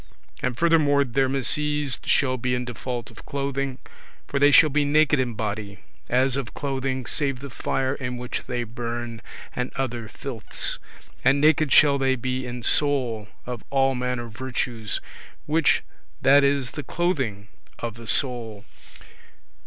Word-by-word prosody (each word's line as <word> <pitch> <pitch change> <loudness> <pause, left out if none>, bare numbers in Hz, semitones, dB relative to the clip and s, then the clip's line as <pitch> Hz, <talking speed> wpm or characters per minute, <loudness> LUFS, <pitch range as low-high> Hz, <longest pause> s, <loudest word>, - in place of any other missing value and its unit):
And 125 -2 -1
furthermore, 155 -4 +4
their 135 +1 +1
misease 145 +1 +2
shall 130 -2 +2
be 125 0 -1
in 125 0 -2
default 120 0 -5
of 115 - -13
clothing, 140 -1 -2 0.5
for 140 - -2
they 145 +1 +6
shall 150 +1 +7
be 150 +1 +2
naked 150 0 +3
in 125 -3 -1
body, 105 -2 -4 0.3
as 130 +1 +3
of 135 -3 -4
clothing, 135 -2 -2
save 140 -1 -1
the 140 0 -8
fire 130 +2 -1
in 125 -3 -4
which 125 0 -4
they 120 -1 -2
burn, 120 0 -5 0.3
and 125 0 -2
other 120 -4 -3
filths; 120 -2 -4 0.4
and 135 +2 +4
naked 155 -1 +4
shall 140 -2 +6
they 135 -1 +2
be 130 +1 -3
in 120 0 -6
soul, 125 -7 +1 0.2
of 125 -2 -6
all 135 -1 +3
manner 125 -1 -2
virtues, 115 -2 -3 0.5
which 160 +2 +3 0.4
that 140 +2 +7
is 140 -3 +1
the 145 - -5
clothing 130 - -2 0.3
of 115 -1 -4
the 115 0 -11
soul. 115 -4 -1
130 Hz, 150 wpm, -24 LUFS, 120-140 Hz, 0.5 s, shall